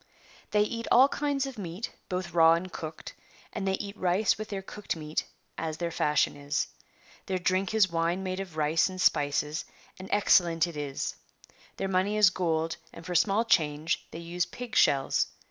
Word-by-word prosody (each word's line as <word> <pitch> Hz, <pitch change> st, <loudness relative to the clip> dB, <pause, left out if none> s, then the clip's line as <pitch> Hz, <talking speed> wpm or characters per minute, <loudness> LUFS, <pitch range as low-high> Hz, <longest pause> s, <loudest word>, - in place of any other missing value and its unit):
They 210 Hz, 0 st, +3 dB
eat 230 Hz, +2 st, -4 dB
all 255 Hz, +3 st, +8 dB
kinds 285 Hz, -2 st, -1 dB
of 265 Hz, -5 st, -7 dB
meat, 185 Hz, +6 st, -5 dB, 0.2 s
both 180 Hz, -2 st, -3 dB
raw 165 Hz, -1 st, +7 dB
and 175 Hz, +2 st, -3 dB
cooked, 160 Hz, -1 st, -7 dB, 0.4 s
and 195 Hz, -, -3 dB
they 190 Hz, -, +2 dB
eat 200 Hz, +1 st, -6 dB
rice 185 Hz, +2 st, +2 dB
with 215 Hz, 0 st, -7 dB
their 195 Hz, -2 st, -4 dB
cooked 210 Hz, 0 st, -5 dB
meat 155 Hz, -1 st, -3 dB, 0.3 s
as 160 Hz, -1 st, -3 dB
their 170 Hz, 0 st, -2 dB
fashion 150 Hz, -2 st, +1 dB
is. 145 Hz, 0 st, -2 dB, 0.6 s
Their 190 Hz, -, 0 dB
drink 185 Hz, +3 st, 0 dB
is 195 Hz, -5 st, +4 dB
wine 170 Hz, +3 st, 0 dB
made 185 Hz, 0 st, -3 dB
of 180 Hz, -5 st, -7 dB
rice 155 Hz, +4 st, +2 dB
and 185 Hz, 0 st, -8 dB
spices, 150 Hz, -1 st, +1 dB, 0.4 s
and 185 Hz, -, -9 dB
excellent 175 Hz, -5 st, +4 dB
it 170 Hz, -2 st, -7 dB
is. 145 Hz, -2 st, -4 dB, 0.6 s
"^riieir 195 Hz, 0 st, -2 dB
money 190 Hz, +3 st, +1 dB
is 205 Hz, -3 st, +6 dB
gold, 165 Hz, -3 st, -1 dB
and 165 Hz, -, -12 dB
for 180 Hz, -, -4 dB
small 195 Hz, +6 st, +3 dB
change 155 Hz, -5 st, +1 dB
they -, -, -8 dB
use 170 Hz, +1 st, -2 dB
pig 245 Hz, 0 st, -8 dB
shells. 140 Hz, -, +3 dB
180 Hz, 180 wpm, -28 LUFS, 160-200 Hz, 0.6 s, all